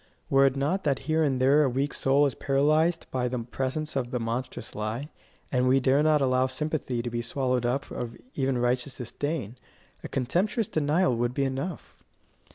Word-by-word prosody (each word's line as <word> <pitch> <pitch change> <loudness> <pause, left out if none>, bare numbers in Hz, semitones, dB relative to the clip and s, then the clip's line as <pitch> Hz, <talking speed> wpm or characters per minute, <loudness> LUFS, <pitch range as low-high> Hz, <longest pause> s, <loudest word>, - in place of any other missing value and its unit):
Were 135 0 +6
it 135 - 0
not 150 +8 0
that 140 -3 0
here 160 +1 +2
and 135 -4 +1
there 135 +4 +5
a 140 - +3
weak 135 +3 -1
soul 140 +2 +3
is 140 - 0
paralysed 155 +5 +2
by 125 -1 0
the 125 +1 -2
presence 130 +6 -3
of 125 -3 -1
the 125 - -2
monstrous 115 +3 -4
lie, 110 +7 -4 0.4
and 125 -1 +2
we 130 +1 +5
dare 135 +2 +3
not 155 -1 +3
allow 130 -1 +3
sympathy 130 -3 -2
to 120 - -3
be 120 0 -2
swallowed 125 0 -1
up 135 +3 -2
of 115 -1 -5 0.2
even 135 -2 0
righteous 125 +2 0
disdain, 130 -1 -4 0.5
a - - -4
contemptuous 185 - 0
denial 155 0 +2
would 120 +1 -1
be 140 - +1
enough. 135 +6 -5
135 Hz, 185 wpm, -27 LUFS, 125-150 Hz, 0.5 s, Were